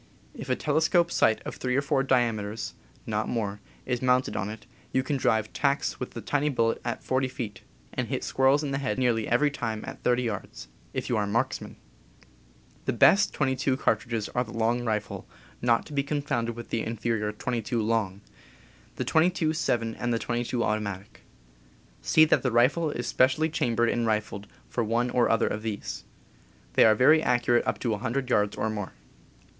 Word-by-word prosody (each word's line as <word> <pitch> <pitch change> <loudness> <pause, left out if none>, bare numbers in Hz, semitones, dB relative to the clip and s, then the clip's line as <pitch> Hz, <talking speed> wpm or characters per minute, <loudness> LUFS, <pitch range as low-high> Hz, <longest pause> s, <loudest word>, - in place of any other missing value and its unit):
If - - -8
a 130 - +2
telescope 160 +4 +2
sight 110 - +2
of - - -6
three 125 -1 -1
or 140 - +3
four 140 -2 +1
diame 120 -5 +2
ters 105 +2 -5 0.3
(not 110 0 -2
more) 105 -4 -2 0.3
is 125 -2 -2
mounted 125 0 +2
on 100 0 -2
it, 110 +1 -9 0.3
you 130 - +1
can 140 +2 -1
drive 110 -4 +1
tacks 140 0 0
with 125 - -6
the 115 - -5
tiny 145 +7 0
bullet 115 -4 0
at 120 - -4
40 130 0 0
feet, 115 -6 -6 0.3
and - - -2
hit - - -3
squirrels 135 +3 +3
in 140 - -2
the 135 - -1
head 135 -1 -2
nearly 120 -4 +1
every 145 +5 +3
time 110 -5 -4
at - - -8
30 125 0 +2
yards 100 - -5
— - - -31
if - - -2
you 120 - 0
are 105 - +1
a - - -5
marks 115 +4 0
man. - - -9 1.1
The - - 0
best 200 +1 +5
.22 130 -1 0
cartridges 110 -2 0
are 125 - 0
the 115 - -11
Long 115 +2 +1
Rifle 110 -3 -3 0.3
(not 120 -1 +2
to 150 - -10
be 140 - +2
confounded 140 -5 -2
with 120 0 -9
the 115 - 0
inferior 115 -1 -2
.22 115 0 -2
Long), 105 -4 -1 0.7
the - - -3
.22 160 -1 +2
7 115 -8 0
and 120 +1 -3
the 115 - +2
.22 120 +1 -2
Automatic. 100 -3 -3 0.8
See 155 - +5
that 155 - +3
the 130 - 0
rifle 135 +8 +3
is 120 -4 -4
specially 140 +7 +2
chambered 120 -6 +1
and 120 -1 0
rifled 105 -2 -2 0.2
for 120 - -1
one 120 +3 0
or 120 -2 +2
other 115 - +3
of 105 - -3
these. 110 -2 -5 0.7
They - - +6
are 110 -1 +6
very 150 +7 +5
accurate 120 -3 +2
up - - 0
to 120 - 0
100 125 +5 -2
yards 105 -2 +2
or - - 0
more. 105 -3 -5
120 Hz, 195 wpm, -27 LUFS, 110-130 Hz, 1.1 s, They